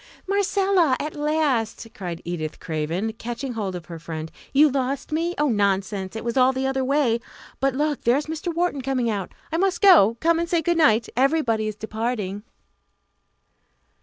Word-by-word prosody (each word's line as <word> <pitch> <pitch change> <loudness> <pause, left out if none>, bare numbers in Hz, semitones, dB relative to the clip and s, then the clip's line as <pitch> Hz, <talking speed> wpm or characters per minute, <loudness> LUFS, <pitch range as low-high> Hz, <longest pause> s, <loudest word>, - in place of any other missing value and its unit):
"Marcella! 390 -6 +2
at 300 +1 -4
last!" 295 -7 0
cried 175 -4 -6
Edith 165 -3 -4
Craven, 165 +8 -2
catching 240 +3 -5
hold 200 -5 -3
of 175 -1 -7
her 170 -1 -8
friend; 160 -1 -6 0.2
"you 295 +3 +6
lost 275 0 -2
me? 335 +3 -1
Oh, 295 - +2
nonsense; 200 -2 0
it 225 - -5
was 235 - -2
all 260 0 +5
the 265 0 -2
other 265 0 0
way. 260 -4 +2 0.4
But 270 0 +1
look, 295 0 0
there 240 +3 +3
is 295 - -2
Mr. 320 +2 -4
Wharton 335 -4 -1
coming 255 -3 0
out. 200 -3 -4 0.2
I 325 - 0
must 370 0 +1
go 280 - +6
come 330 0 +2
and 340 0 -2
say 335 -2 +1
good 345 +2 +1
night 235 -8 +4
everybody 250 -5 +2
is 215 - -4
departing." 215 -2 -3
255 Hz, 175 wpm, -23 LUFS, 210-305 Hz, 0.4 s, you